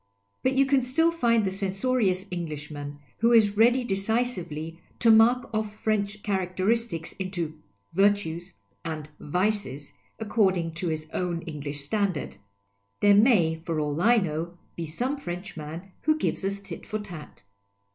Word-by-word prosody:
But 260 - +2
you 270 +1 +4
can 270 0 +3
still 325 +7 +2
find 235 -9 +2
the 190 - 0
censorious 195 0 0
Englishman 150 -4 -5 0.2
who 230 +1 +4
is 210 -3 +5
ready 240 +3 +4
deci 220 +3 +1
sively 165 -2 -6 0.2
to 230 - +5
mark 235 +3 +5
off 215 -1 -2
French 210 -1 -1
characteristics 190 -1 -1
into 175 -5 -3
" 100 0 -41
virtues 195 -3 +1 0.2
" - - -42
and 155 -1 -6
" - - -34
vices," 180 -4 -1 0.2
according 190 -6 +1
to 170 +2 -3
his 155 -1 -2
own 175 -2 -2
English 145 -2 -5
standard. 190 +1 -1 0.6
There 205 0 +6
may, 195 -8 +4
for 165 -2 -2
all 150 +1 -1
I 235 +4 +5
know, 170 -2 -2 0.2
be 165 -1 -4
some 250 - -1
Frenchman 175 - -7
who 310 0 +2
gives 310 - -1
us 200 +1 -1
tit 200 - -9
for 215 - -3
tat. 175 - -9
190 Hz, 155 wpm, -27 LUFS, 160-220 Hz, 0.6 s, There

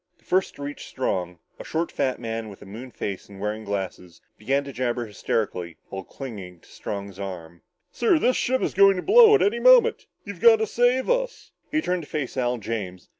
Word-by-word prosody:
The - - -32
first 185 +1 +1
to 140 - -8
reach 145 +1 -7
Strong, 90 -9 -2 0.2
a - - -7
short 165 +1 -2
fat 130 -2 -1
man 115 -1 -4
with 100 - -12
a - - -13
moonface 105 -2 -7
and 100 -1 -12
wearing 105 +2 -3
glasses, 95 -4 -5 0.2
began 135 +6 0
to 140 -1 -9
jabber 120 -1 -1
hysterically, 90 -5 -3
while 95 0 -6
clinging 95 -8 -9
to - - -22
Strong's 100 -1 -6
arm. 85 -4 -7 0.3
"Sir, 385 -7 +2
this 255 -4 +2
ship 260 +1 0
is - - -1
going 195 0 +6
to 180 - -4
blow 440 +1 +7
up 420 - +2
any 430 +4 +2
moment. - - +5 0.2
You've - - -8
got 465 -1 +8
to 445 0 -1
save 250 - +2
us!" - - -1 0.2
He 310 0 0
turned 180 -1 -1
to 145 - -12
face 150 -4 -3
Al 125 -1 0
James. 100 -5 -5
125 Hz, 205 wpm, -24 LUFS, -, 0.3 s, got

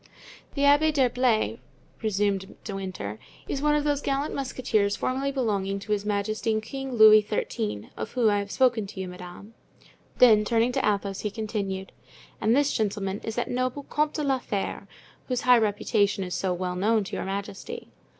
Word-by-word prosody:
"The 280 - 0
Abbé 290 +2 +5
d'Herblay," 250 -5 +1 0.4
resumed 200 -2 -1
De 205 - -5
Winter, 180 - -5 0.3
"is 275 - -2
one 300 0 +3
of 295 - +1
those 290 -1 0
gallant 280 +1 -1
musketeers 235 -6 0
formerly 270 +2 -1
belonging 200 -7 -1
to 200 +2 -7
His 205 -1 0
Majesty 215 +2 0
King 270 +4 -6
Louis 215 -1 +8
XIII., 105 - -3
of - - -6
whom 245 -3 +2
I 205 - +2
have 200 0 -5
spoken 240 -3 +2
to 195 - -9
you, 190 - -3
madame." 180 +4 -10 0.6
Then 220 -4 +7
turning 230 +3 +2
to - - -1
Athos, 200 -2 0
he 210 - -2
continued, 200 -3 -4 0.5
"And 225 +3 +3
this 285 0 +2
gentleman 200 -2 -1
is 225 - -4
that 240 - -1
noble 255 +3 -1
Comte 300 +2 -1
de 305 - -1
la 270 -2 +1
Fere, 200 -5 -4 0.4
whose 250 -2 -1
high 250 -1 +6
reputation 205 -2 +1
is 180 -1 -5
so 190 - -1
well 180 0 -2
known 215 +3 +2
to 195 - -6
your - - -3
majesty." 200 - -6
215 Hz, 180 wpm, -26 LUFS, 200-255 Hz, 0.6 s, Louis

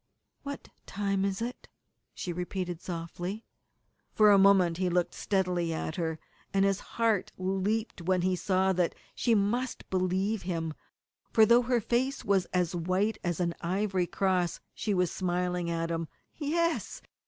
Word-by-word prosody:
"What 280 0 -7 0.2
time 195 -1 -1
is 195 +2 -1
it?" 245 +2 -6 0.5
she 180 - -4
repeated 180 0 -4
softly. 175 +4 -5 0.7
For 215 -1 +7
a 200 - +7
moment 190 -4 +5
he 185 0 +1
looked 175 0 +1
steadily 180 -4 0
at 160 - -4
her, 160 -2 -1 0.3
and 195 0 +3
his 195 0 +2 0.2
heart 225 -4 +2
leaped 195 +3 -1
when 180 +1 +1
he 185 0 +2
saw 190 +1 +2
that 180 -2 +1 0.2
she 235 -2 +2
must 235 +5 0
believe 190 +3 0
him, 165 -3 -3 0.6
for 220 - +6
though 235 +3 +6
her 245 0 +1
face 250 +5 0
was 195 -3 +3
as 180 -1 0
white 185 +5 0
as 175 -2 -1
an 170 -1 0
ivory 185 0 0
cross 185 -3 0
she 210 -2 -1
was 180 -2 +2
smiling 180 -1 -1
at 165 0 -1
him 165 -1 -2 0.3
yes! 335 +2 -1
190 Hz, 155 wpm, -29 LUFS, 175-210 Hz, 0.7 s, For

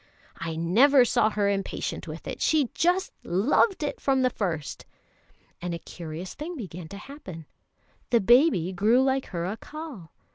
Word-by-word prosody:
I 165 -1 -4
never 245 - +5
saw 215 - +3
her 205 -1 0
impatient 195 -1 -2
with - - -8
it; - - -6
she 300 -6 +2
just 360 +3 +1
loved 275 - +2
it 290 - -3
from 265 -1 +2
the 255 - +3
first." 165 -10 -4 0.7
And 175 -1 -3
a - - -4
curious 165 +1 -8
thing 335 +4 -6
began 180 - -7
to 200 - -9
happen: 200 - -10 0.6
the 235 - +4
baby 235 - +4
grew 220 +8 +4
like 265 0 0
her 170 -3 -4
Accal. 225 - -7
215 Hz, 155 wpm, -26 LUFS, 175-275 Hz, 0.7 s, never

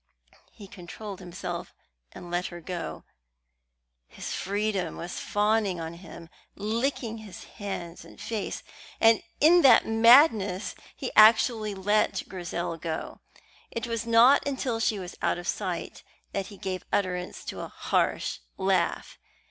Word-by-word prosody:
He 200 - -12
controlled 190 +2 -9
himself 180 -1 -6 0.4
and 175 - -10
let 175 +1 -1
her 175 - -8
go. 175 +1 -6 1.0
His - - -7
freedom 200 -3 -2
was 175 +1 -6
fawning 205 -3 +1
on 165 0 -5
him, 170 -1 -11 0.3
licking 225 +2 -2
his 210 -4 -10
hands 185 -5 -7
and - - -15
face, 220 -3 -4 0.4
and 225 0 +5 0.2
in 340 +4 +6
that 260 -6 +7
madness 225 - +5 0.2
he - - -5
actually 215 -1 +5
let 205 +3 +1
Grizel 175 -2 -4
go. 160 -1 -5 0.5
It 230 - -4
was 230 -1 -3
not 235 +5 +6
until 260 -4 -2
she 225 -1 +1
was 180 -2 -7
out - - +1
of 175 0 -7
sight 185 -4 -3 0.3
that 195 -1 -3
he 200 - -12
gave 185 -2 -4
utterance 180 -2 -2
to - - -6
a - - -5
harsh - - -1 0.2
laugh. - - 0
205 Hz, 135 wpm, -27 LUFS, 180-225 Hz, 1.0 s, that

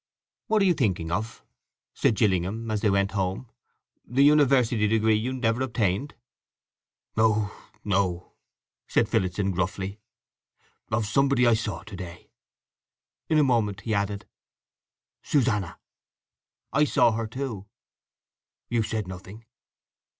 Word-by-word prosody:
"What 215 -2 +3
are - - +3
you 180 - +4
thinking 95 - -1
of?" 110 +6 -3 0.5
said 110 - +2
Gillingham, 105 +2 0
as 105 -1 -1
they 105 - +3
went 100 0 +1
home. 95 +5 -3 0.5
"The 130 +4 +2
university 135 -7 +4
degree 110 0 +3
you 110 +4 0
never 125 -2 0
obtained?" 115 0 -1 1.0
"No, 110 -2 +2 0.3
no," 95 -3 -1 0.5
said - - +2
Phillotson 95 +2 0
gruffly. 95 +3 -3 0.9
"Of 110 0 0
somebody 135 +3 +2
I 120 - +5
saw 110 -6 -2
to 105 0 -10
day." 90 -1 -9 1.0
In 155 - +3
a 150 - +5
moment 110 -7 +1
he 110 - -2
added, 100 0 -1 1.0
"Susanna." 115 - 0 1.0
"I 150 - +4
saw 120 -5 +4
her, 110 0 -2
too." 110 -4 -5 1.0
"You 120 -1 +1
said 110 -2 -3
nothing." 95 +4 -10
110 Hz, 120 wpm, -26 LUFS, 100-120 Hz, 1.0 s, I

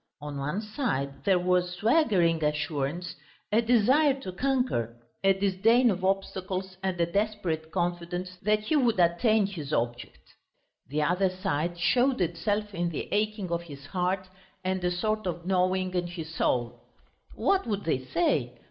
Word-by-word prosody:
On 145 -1 -6
one 150 +9 -2
side 210 - -3
there 195 -2 +4
was 180 0 +1
swaggering 185 - +3
assurance, 150 +2 -1 0.4
a 220 +2 +4
desire 255 +5 +4
to 185 - -5
conquer, 185 - 0 0.3
a 195 - +6
disdain 200 +5 +3
of 185 -1 -4
obstacles 190 -1 -2
and 190 -2 -2
a 170 - +4
desperate 185 -4 -1
confidence 175 +1 -3
that 210 +1 +2
he 215 +9 0
would 240 -8 +2
attain 205 +5 +3
his 165 -8 -6
object. 120 -2 -3 0.5
The 150 +3 0
other 180 +4 +2
side 175 -3 -2
showed 250 +9 +2
itself 200 +5 -1
in 175 -2 -1
the 160 - -5
aching 210 -3 -1
of 170 0 0
his 145 -5 -11
heart, 185 +3 -1 0.4
and 185 0 -1
a 180 - +2
sort 215 +3 -1
of 170 -1 -4
gnawing 185 0 +1
in 175 -1 0
his 165 -2 -7
soul. 120 -7 0 0.5
"What 390 -6 +1
would 205 -2 -2
they 160 -5 +1
say? 130 -4 0
185 Hz, 155 wpm, -28 LUFS, 170-210 Hz, 0.5 s, a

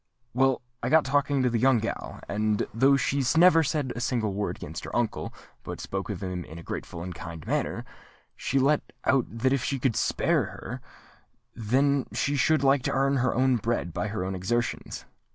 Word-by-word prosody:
Well, 130 0 +2 0.2
I 120 - -1
got 160 +2 +5
talking 140 0 +1
to 125 - +3
the 115 - +1
young 130 0 +4
gal; 110 +1 -4
and 105 +1 0
though 135 +5 +4
she 140 0 0
never 170 -1 +7
said 145 -4 -1
a 120 - -4
single 115 -5 0
word 100 +1 -2
against 80 +1 -7
her - - -6
uncle, 120 -2 -1 0.3
but - - -7
spoke - - -4
of - - -4
him 90 -1 -3
in 80 - -11
a 85 - -9
grateful 85 0 -6
and 90 0 -5
kind 85 -1 -8
manner, - - -1 0.5
she 135 - -1
let 140 +3 +3 0.2
out 135 -3 +3
that 125 +4 0
if 135 -2 0
he 140 - -1
could 125 -3 0
spare - - +1
her, - - -7 1.3
she 145 - 0
should 140 +2 +3
like 135 0 +4
to - - -1
earn 135 +1 +2
her 125 -1 +1
own 130 0 +3
bread 110 -6 -2
by 105 - -2
her 105 -3 -3
own 95 - -3
exertions. 120 +6 -2
125 Hz, 195 wpm, -27 LUFS, 105-135 Hz, 1.3 s, never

